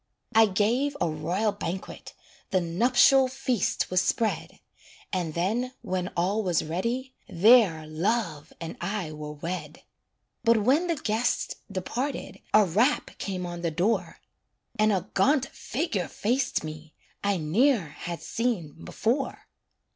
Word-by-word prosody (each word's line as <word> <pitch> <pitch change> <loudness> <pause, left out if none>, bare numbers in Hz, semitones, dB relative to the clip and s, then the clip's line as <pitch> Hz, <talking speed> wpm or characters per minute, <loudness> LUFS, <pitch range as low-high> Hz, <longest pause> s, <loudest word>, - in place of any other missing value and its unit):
I 225 0 +7
gave 235 +9 +1
a 175 - +2
royal 170 +7 0
banquet, 190 -2 -6 0.3
The 190 - +2
nuptial 245 +9 +4
feast 255 -8 -1
was 185 0 +4
spread, 220 +3 -1 0.5
And 175 -4 -2
then, 225 +9 0
when 180 -1 -2
all 195 +5 +1
was 180 -5 +1
ready, 235 +11 -2 0.2
There 185 -4 +5
Love 160 -1 -1
and 165 -1 -6
I 195 -3 -2
were 150 0 -7
wed. 155 0 -6 0.6
But 230 -2 +4
when 290 - +3
the 335 - +1
guests 230 -3 0 0.2
departed, 240 +9 -3
A 215 -1 +6
rap 220 - +2
came 185 -2 -3
on 175 -1 -6
the 170 - 0
door, 180 +8 0 0.6
And 215 0 +4
a 190 -1 -1
gaunt 275 -2 +3
figure 225 - -2
faced 245 0 0
me 155 0 -8 0.3
I 200 -1 +2
ne'er 190 - +2
had 170 +3 -7
seen 180 -11 -2
before. 260 +5 -1
200 Hz, 130 wpm, -27 LUFS, 170-240 Hz, 0.6 s, I